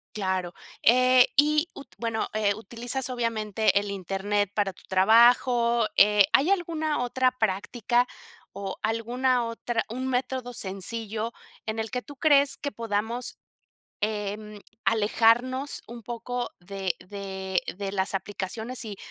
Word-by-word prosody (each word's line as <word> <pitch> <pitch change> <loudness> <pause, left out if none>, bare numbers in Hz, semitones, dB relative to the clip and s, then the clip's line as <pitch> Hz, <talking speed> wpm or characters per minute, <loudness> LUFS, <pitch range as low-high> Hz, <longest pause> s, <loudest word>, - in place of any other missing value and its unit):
Claro, 185 -3 -1 0.3
eh, 255 +1 +6
y, 300 +3 +4
ut 280 - -10
bueno, 230 -1 -1
eh, 210 -2 +1
utilizas 240 +5 -4
obviamente 220 -4 +1
el 205 0 -4
Internet 200 +1 -1
para 200 -2 0
tu - - -19
trabajo, 235 +3 +5
eh, 210 0 +6
¿hay 285 +6 +4
alguna 320 -7 0
otra 255 +1 +2
práctica, 235 +2 0 0.4
o, 195 -1 -6
alguna 240 +3 +1
otra 230 0 -2
un 255 +3 -3
método 255 -1 -2
sencillo 215 +3 -3 0.4
en 220 0 -2
el 220 -1 -3
que 250 - -2
tú 290 - -12
crees 280 -1 +4
que 285 - -4
podamos, 230 +1 -3 0.6
em, 210 0 -3 0.3
alejarnos 235 +5 +2
un 235 0 -9
poco 240 +2 -4
de 190 0 -3
de 190 -1 -4
de 195 0 -4
las 195 0 -1
aplicaciones, 220 +6 -4
y, 210 -3 -6
225 Hz, 130 wpm, -26 LUFS, 205-250 Hz, 0.6 s, eh